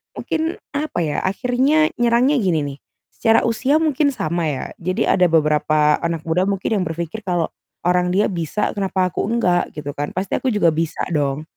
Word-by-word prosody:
Mungkin, 320 +1 -2 0.2
apa 290 -7 -2
ya 150 - -2
akhirnya 255 +10 +2
nyerangnya 240 +4 +3
gini 180 -6 +1
nih, 140 -1 -5 0.3
secara 225 0 +2
usia 245 +5 +1
mungkin 290 -2 +1
sama 165 +1 -1
ya. 140 -4 -3
Jadi 185 +1 -1
ada 180 - +3
beberapa 150 -1 +2
anak 165 -2 -2
muda 175 +4 0
mungkin 200 +1 0
yang - - -1
berpikir, 170 +5 -4
"kalau 175 -3 -1 0.3
orang 180 0 +2
dia 205 - +3
bisa, 170 +4 -2
kenapa 190 -2 0
aku - - -2
enggak? 180 -7 +1
Gitu 145 -1 -5
kan, 145 +1 -3
pasti 185 +1 -1
aku - - -3
juga 170 -5 +4
bisa 160 0 -2
dong". 145 -1 0
180 Hz, 175 wpm, -20 LUFS, 160-235 Hz, 0.3 s, juga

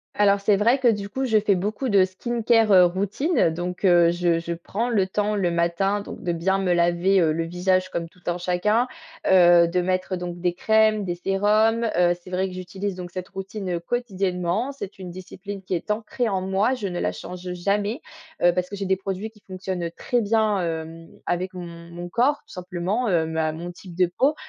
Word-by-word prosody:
Alors 200 -1 +3
c'est 200 0 +3
vrai 235 +6 +4
que 260 -2 +1
du 200 -2 -1
coup 265 +5 -2
je 220 -4 +3
fais 200 -2 +2
beaucoup 210 +7 -2
de 195 -2 +5
skincare, 225 +2 +1
heu, 185 -2 +8
routine. 200 - +1
Donc, 180 +3 -5
heu, 175 -2 +5
je 175 -1 +1
je 170 0 -3
prends 205 +8 -3
le 195 -5 +2
temps 210 +2 0
le 185 -4 +1
matin, 170 +4 0
donc - - -9
de 175 - -1
bien 190 +4 +1
me 185 -2 0
laver, 175 +3 +3
heu, 160 -2 +3
le 165 - -1
visage 185 +2 0
comme 170 -2 -3
tout 180 +2 -24
un 175 0 0
chacun. 185 +7 +1 0.4
Heu, 175 -2 +6
de 180 +1 0
mettre 185 +1 -1
donc: 175 -1 -5
des 175 0 0
crèmes, 220 +2 +3
des 175 -2 -2
sérums. 210 +5 +2
Heu, 175 0 +4
c'est 185 - -11
vrai 185 +1 0
que 185 - -8
j'utilise 190 +2 -4
donc 180 -1 -7
cette 180 0 -6
routine, 195 0 -5
heu, - - -4
quotidiennement. 195 0 -1
C'est 200 -9 -8
une 185 - -7
discipline 190 +2 -8
qui 185 - -4
est 175 +4 -3
ancrée 220 +2 -1
en 190 -1 -1
moi, 195 +7 +1
je 210 -6 -4
ne 175 -2 -4
la - - 0
change 180 0 -7
jamais. 205 - -1 0.4
Heu, 175 - +6
parce 180 0 -2
que 200 - -6
j'ai 195 - -4
des 190 0 +2
produits 195 +3 -4
qui 210 -2 -23
fonctionnent 185 -2 -4
très 245 -2 0
bien, 215 -2 +2
hem, 165 0 -5 0.2
avec 185 +1 -2
mon 180 -1 -6 0.2
mon 175 +1 -7
corps 255 +10 +2
tout 295 - -15
simplement, 185 +6 -2
heu, 165 -4 +2
ma 160 -1 -1
mon 170 +3 -6
type 175 0 -12
de 180 +1 +4
peau. 285 +3 +3
185 Hz, 215 wpm, -24 LUFS, 175-210 Hz, 0.4 s, heu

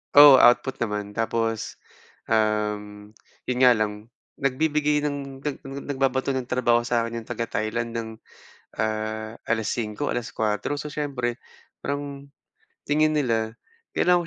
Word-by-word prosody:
Oo, 145 -1 +11
output 125 +2 +5
naman. 105 -2 -4
Tapos, 115 0 -1 0.5
um, 105 -1 -1 0.3
yun 125 - 0
nga 125 - +9
lang 105 +1 -3 0.3
nagbibigay 150 +2 +2
ng 140 -2 -4
nag 145 0 -4
nagbabato 135 -1 -1
ng 130 -2 -3
trabaho 120 -2 +3
sa 120 -1 +1
akin 115 0 -4
yung - - -22
taga-Thailand 115 0 -2
ng, 115 -1 -3 0.7
ah, 110 0 -2 0.2
alas 110 -2 0
singko, 115 +4 -2
alas 120 -1 -3
kuwatro. 110 +6 0
So, 150 0 -6
siyempre 125 -5 -2 0.4
parang 140 0 -4 0.6
tingin 155 +1 +3
nila 115 -4 0 0.4
kailangan 180 -1 +4
120 Hz, 125 wpm, -25 LUFS, 110-140 Hz, 0.7 s, Oo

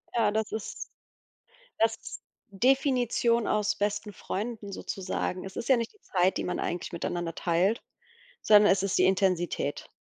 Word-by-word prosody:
Ja, 220 -3 +3
das 220 0 -1
ist 220 -1 -6 0.9
das 225 0 +2
ist 220 - -9 0.3
Definition 245 0 +2
aus 210 -1 +1
besten 205 0 -2
Freunden 210 +1 -5
sozusagen. 185 -1 -3
Es 195 - -9
ist 235 - -4
ja 265 - +6
nicht 230 -1 -3
die 425 - -27
Zeit, 185 -1 +1
die - - -1
man 180 - -2
eigentlich 175 +1 -3
miteinander 170 0 -3
teilt, 180 +6 +1 0.6
sondern 210 -2 +6
es 195 - +2
ist 195 -1 0
die - - +5
Intensität. 185 -6 0
205 Hz, 155 wpm, -28 LUFS, 185-225 Hz, 0.9 s, ja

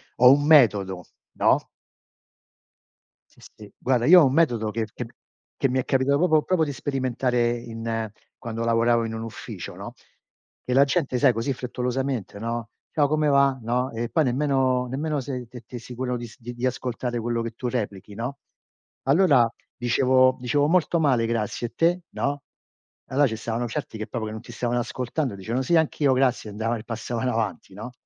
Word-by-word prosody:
ho 125 +1 +7
un 145 +1 +1
metodo, 100 - +4 0.3
no? - - +2 1.7
Sì, - - -25
sì, 105 -1 -14
guarda, 125 -2 +1
io 180 +4 +9
ho - - +6
un 130 - +1
metodo 120 -9 +2
che 110 +1 -2
che 125 - -5 0.5
che 135 - +1
mi 130 +1 +1
è 130 - -2
capitato 135 +1 +2
proprio- 155 -1 +3
proprio 180 -4 +1
di 145 - -4
sperimentare 130 -3 0
in 115 -1 -4 0.3
quando 115 0 -5
lavoravo 115 0 +3
in 115 - -4
un 115 - -4
ufficio, 115 - -7
no, - - -8 0.7
che 125 - -2
la 135 +2 +6
gente, 140 -2 0
sai, 130 -1 +4
così 115 +5 -1
frettolosamente, 125 -3 -3
no: 115 +1 -4 0.2
“Ciao, 145 -3 +2
come 155 +1 +1
va?” 140 -1 +4
No, 125 +3 0
e 115 0 -3
poi 160 -3 +2
nemmeno 130 -1 +1
nemmeno 145 +4 -2
sei 125 -2 -5
t 120 0 -11
t 125 - -11
sicuro 125 +1 -4
di 120 -1 -7
di 120 +1 -5
ascoltare 125 -1 -2
quello 115 0 -1
che 115 0 -4
tu 120 +2 -5
replichi, 105 -5 -4
no. 120 +6 -4 0.7
Allora 140 -5 +4 0.3
dicevo 130 +2 +3
dicevo: 135 +4 +1
“Molto 170 0 +2
male, 130 -7 +2
grazie. 115 +1 -2
E - - -34
te?” 175 +2 +2
No, 140 0 -2 0.7
allora 145 +2 +3
ci 110 - -4
stavano 115 +2 -3
certi 110 0 -5
che 110 +1 -5
proprio 110 0 -4
che 110 - -5
non 110 0 -7
ti 120 - -12
stavano 120 +1 -1
ascoltando, 125 +1 -3
dicevano: 115 +7 -2
"Sì, 170 - +2
anch'io, 145 -3 +2
grazie", 130 -4 +1
andavano 115 +3 -2
e - - -10
passavano 120 +2 -3
avanti, 105 -6 -3
no, 110 +6 -8
125 Hz, 180 wpm, -24 LUFS, 115-135 Hz, 1.7 s, io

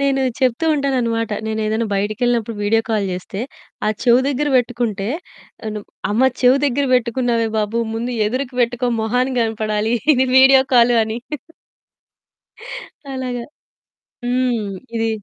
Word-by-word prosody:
నేను 275 -1 +1 0.2
చెప్తూ 260 +3 +1
ఉంటానన్నమాట. 240 -6 0 0.2
నేనేదైనా 220 +1 -1
బయటికెళ్ళినప్పుడు 230 +3 0
వీడియో 225 +2 +2
కాల్ 215 -3 0
జేస్తే, 185 +2 -5 0.5
ఆ! - - +3
చెవి 245 0 +5
దగ్గర 285 +2 0
బెట్టుకుంటే 230 -5 -1 0.6
తను. 215 -1 -4 0.3
అమ్మ 255 +5 +4
చెవి 250 +2 +6
దగ్గర 280 +1 0
బెట్టుకున్నావే 235 -1 +1
బాబు. 215 +2 0
ముందు 235 +2 -3
ఎదురికి 255 +3 -3
పెట్టుకో 245 +1 +1
మొహానికి 250 +3 0
గనపడాలి. 215 0 -1 0.2
ఇది 260 0 +2
వీడియో 265 0 +7
కాల్ 240 0 +5
అని. 220 +1 -4 2.0
అలాగా. 250 -2 -4 0.8
హ్మ్. 245 -5 -1 0.2
ఇది 225 0 0
235 Hz, 120 wpm, -19 LUFS, 220-255 Hz, 2.0 s, వీడియో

